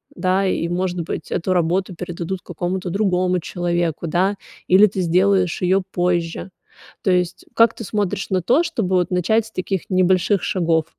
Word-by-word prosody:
да, 185 +2 +1
и 170 - -1
может 180 0 -1
быть 165 - -6
эту 185 +2 0
работу 180 +2 0
передадут 175 +1 -5
какому-то 180 +2 -3
другому 185 -1 +1
человеку, 170 -1 -2
да, 185 +5 +1 0.3
или 195 +3 +6
ты 195 -1 -3
сделаешь 185 +1 +2
её 190 +1 +2
позже. 175 0 -1 0.5
То 190 - +2
есть 180 -1 0
как 230 0 +4
ты - - -7
смотришь 205 -1 -2
на 185 -1 +2
то, 250 - +3
чтобы 190 - -1
вот 180 0 0
начать 200 +5 +2
с - - -16
таких 190 -2 -2
небольших 185 +1 +2
шагов? 165 -3 +1
185 Hz, 165 wpm, -20 LUFS, 175-190 Hz, 0.5 s, или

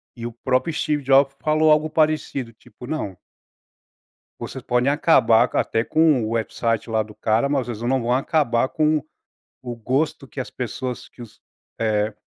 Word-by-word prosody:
e 115 -1 -7
o 120 - -5
próprio 130 +6 -1
Steve 150 -1 -1
Jobs 135 +1 +4
falou 155 0 +3
algo 155 +1 +3
parecido, 155 -6 0
tipo, 115 +2 -15
não 115 - -4 1.2
vocês 130 -2 -7
podem 125 +2 +1
acabar 125 -6 +4
até 115 - +1
com 155 -6 +3
o 110 - -4
website 115 0 -1
lá 110 -1 +1
do 105 0 -14
cara, 110 +4 +1
mas 135 -4 -1
vocês 115 -2 -6
não 130 +1 +1
vão 120 - -1
acabar 130 -3 +1
com 155 -1 +1 0.6
o 120 -1 -5
gosto 135 +4 -1
que 140 - -9
as 130 - -5
pessoas 125 0 -5
que - - -15
os, 115 -3 -13 0.4
eh 105 -1 0
130 Hz, 165 wpm, -22 LUFS, 115-150 Hz, 1.2 s, Jobs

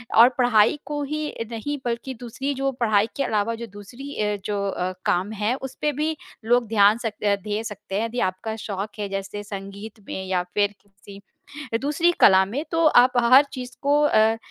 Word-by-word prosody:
और 235 +3 +8
पढ़ाई 245 +2 +4
को 295 +1 -3
ही 305 +2 -3 0.2
नहीं 290 +6 -3
बल्कि 240 +2 -3
दूसरी 265 +4 -3
जो 270 +1 0
पढ़ाई 215 -1 +3
के 275 - +1
अलावा 215 +1 0
जो 235 0 -7
दूसरी 240 +8 -10
अ, 210 0 0
जो 205 -1 -1
अ, 185 -1 -2
काम 185 +4 +1
है, 210 +3 0
उस 265 -1 -7
पे 300 - +2
भी 310 +3 -1 0.3
लोग 240 0 +3
ध्यान 210 0 +5
सकते 215 -2 -3
अ, 200 - +4
धे 210 +2 -4
सकते 200 -2 -7
हैं, 225 - 0
यदि 240 +2 -4
आपका 220 +4 -6
शौक 205 -1 -5
है 205 - -2
जैसे 195 +1 -5
संगीत 200 +2 -8
में 190 - -5
या 180 -1 0
फिर 205 0 +2
किसी 200 0 -15 0.6
अ, - - +3
दूसरी 300 +5 +2
कला 190 -1 +7
में 260 +10 -4
तो 330 -1 +2
आप 250 -2 +5
हर 260 +4 +7
चीज़ 250 -1 -7
को 290 +1 +3
अ, 220 -5 +4
225 Hz, 200 wpm, -23 LUFS, 205-265 Hz, 0.6 s, और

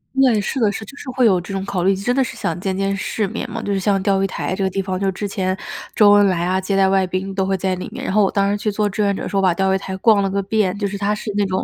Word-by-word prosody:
对， 255 -6 +4
是 205 - -3
的， 215 -4 +3
是， 210 - -6
就 245 +7 -12
是 275 - -8
会 255 -1 +2
有 190 -4 +3
这 175 +3 -7
种 195 0 -2
考 190 -3 -2
虑， 195 +1 +3
真 215 +6 -1
的 270 - +3
是 - - -6
想 170 +1 -3
见 190 +1 -2
见 195 +1 0
世 200 +2 -2
面 - - -5
嘛， 225 +1 -5
就 205 - -3
是 195 - 0
像 195 0 +1
钓 195 0 +1
鱼 - - +3
台 185 -1 -3
这 195 - -2
个 190 - +1
地 195 +1 -2
方， 185 -1 -3
就 195 -1 0
之 205 +3 -4
前 190 -1 -1 0.4
周 205 -1 +6
恩 205 0 +6
来 175 -2 0
啊， 185 +1 +1
接 190 +1 -2
待 195 -1 +4
外 190 -1 +3
宾 185 +2 -3
都 190 -1 +1
会 195 0 0
在 190 0 -1
里 180 - -6
面。 - - -8
然 - - -2
后 210 0 +4
我 195 - +1
当 200 0 +1
时 205 - 0
去 210 +1 -1
做 210 0 0
志 210 +2 -1
愿 200 -1 +1
者 - - -4
时 - - -5
候 195 - +3
把 185 - +4
钓 190 +2 +1
鱼 - - +2
台 190 -1 -6
逛 205 0 +4
了 195 - 0
个 200 +1 -1
遍， 200 -1 0
就 205 - 0
是 200 - -5
它 200 +1 0
是 210 0 -4
那 205 - +2
种， 190 -1 -1
195 Hz, 375 characters per minute, -20 LUFS, 190-205 Hz, 0.4 s, 周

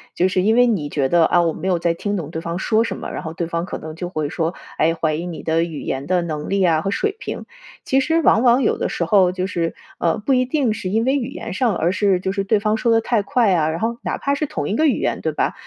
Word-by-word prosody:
就 180 - +3
是 185 0 +1
因 215 +4 +3
为 245 +1 +5
你 180 -11 0
觉 140 -2 0
得， 170 +4 +4
啊， 175 - +4
“我 165 -1 +1
没 190 - -3
有 180 -2 +1
在 170 0 +1
听 205 +4 -3
懂 160 -5 -5
对 160 0 -5
方 170 +2 -4
说 220 +3 +2
什 230 - -4
么，” - - -6
然 - - -5
后 160 - -5
对 170 0 -3
方 170 +1 -2
可 - - -5
能 155 0 -8
就 175 +1 -5
会 155 -4 -2
说， 165 +2 -2 0.2
哎， 160 +2 +3
怀 160 -1 0
疑 165 +3 -4
你 175 -3 -6
的 165 +1 +1
语 165 -4 -5
言 135 +1 -3
的 180 +2 +1
能 155 -3 -4
力 195 0 +1
啊 165 -4 +3
和 195 - -2
水 415 - -1
平。 - - -6 0.4
其 270 +1 +2
实 325 +4 +1
往 225 - +4
往 245 +1 +5
有 - - +1
的 - - -1
时 170 - -2
候， 185 0 +4
就 185 0 -2
是， 170 -3 -2 0.2
呃， 170 - +1
不 225 +6 0
一 255 -1 +3
定 255 -3 0
是 190 -3 -4
因 220 +4 +1
为 265 +2 +2
语 265 -3 -2
言 270 - -6
上， 230 +2 +1
而 175 +3 +1
是 195 -3 +2
就 190 +1 -2
是 195 0 -1
对 205 +2 +2
方 215 +1 +1
说 230 +1 +1
得 225 - +5
太 225 -1 +1
快 240 0 +2
呀。 165 -4 +2
然 160 +1 -3
后 230 +3 -1
哪 - - -3
怕 280 0 0
是 305 - -1
同 - - -4
一 200 - -1
个 315 +6 +3
语 280 - +1
言， - - -1
对 - - -1
吧？ - - -1
185 Hz, 325 characters per minute, -20 LUFS, 165-225 Hz, 0.4 s, 为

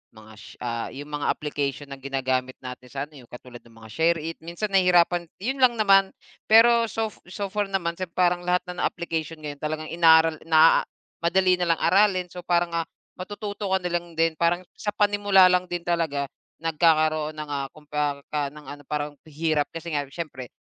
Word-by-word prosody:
mga, 110 0 -14
sh - - -13
ah 115 -1 -3
yung 145 +2 -8
mga 145 0 -2
application 145 -1 -2
na 135 - -7
ginagamit 130 -1 -2
natin 125 0 -8
sa 135 +2 -4
ano 150 -1 -12
yu 125 - -16
katulad 125 0 -11
ng 115 -1 -21
mga 110 - -12
SHAREit. 165 +3 0
Minsan 175 +6 -5
nahihirapan, 175 -2 +3 0.2
'yon 265 +4 -2
lang 250 -2 +5
naman, 195 -3 +4 0.3
pero 230 +1 +6
sof 220 0 -4
so 195 +2 -5
far 210 0 -1
naman, 175 -3 -2
sem 185 - -3
parang 180 -1 +3
lahat 180 0 +2
na 180 0 -6
ng - - +2
application 165 -1 -4
ngayon 145 -1 -6
talagang 155 +1 -4
inaral, 165 -1 +5
naaa 160 0 +5 0.3
madali 180 +1 +2
na 175 - 0
lang - - -14
aralin. 190 -2 +3
So 180 - -8
parang, 175 -1 +1
ah, 165 -1 -2 0.3
matututo 205 +2 -5
ka 190 - +4
na 180 -1 -4
lang 175 0 -3
din 165 0 +1
parang 170 +1 +1 0.2
sa 210 - -3
panimula 205 -3 +4
lang 180 0 +1
din 175 -1 -4
talaga, 160 -5 -1 0.3
nagkakaroon 155 -1 +2
ng, 150 -1 -7
ah, 140 -1 -2
kumparka 150 -1 -3
ng 150 - -11
ano, 145 0 -10
parang 150 -1 -4
hirap 155 -1 0
kasi 165 +1 -6
nga 145 -1 0
siyempre, 135 -7 -6
165 Hz, 190 wpm, -25 LUFS, 145-180 Hz, 0.3 s, pero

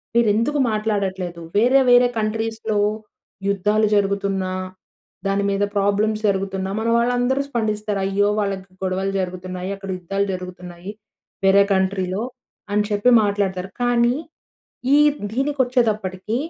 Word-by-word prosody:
మీరు 235 -1 +4
ఎందుకు 285 +7 +1
మాట్లాడట్లేదు, 195 -5 -2
వేరే 250 +5 +5
వేరే 245 0 +6
కంట్రీస్‌లో 220 0 -1 0.7
యుద్ధాలు 210 +2 +2
జరుగుతున్నా, 195 -2 0 0.7
దాని 195 +1 +1
మీద 195 +1 0
ప్రాబ్లమ్స్ 205 +2 +1
జరుగుతున్నా 190 -1 -2
మన 230 - 0
వాళ్ళందరూ 245 +3 +1
స్పందిస్తారు. 215 -4 -1
అయ్యో! 200 +1 +2
వాళ్ళకి 195 -2 -4
గొడవలు 190 +1 -1
జరుగుతున్నాయి. 185 0 -5
అక్కడ 195 0 -9
యుద్ధాలు 195 +3 -1
జరుగుతున్నాయి. 180 0 -8 0.5
వేరే 195 +1 +6
కంట్రీలో 190 +1 0 0.5
అని 210 0 +2
చెప్పి 205 +3 +2
మాట్లాడుతారు. 195 -2 -1
కానీ 245 0 +3 0.8
ఈ - - +6 0.3
దీనికి 275 +4 -1
వచ్చేటప్పటికి 215 -5 -1
200 Hz, 115 wpm, -21 LUFS, 190-220 Hz, 0.8 s, వేరే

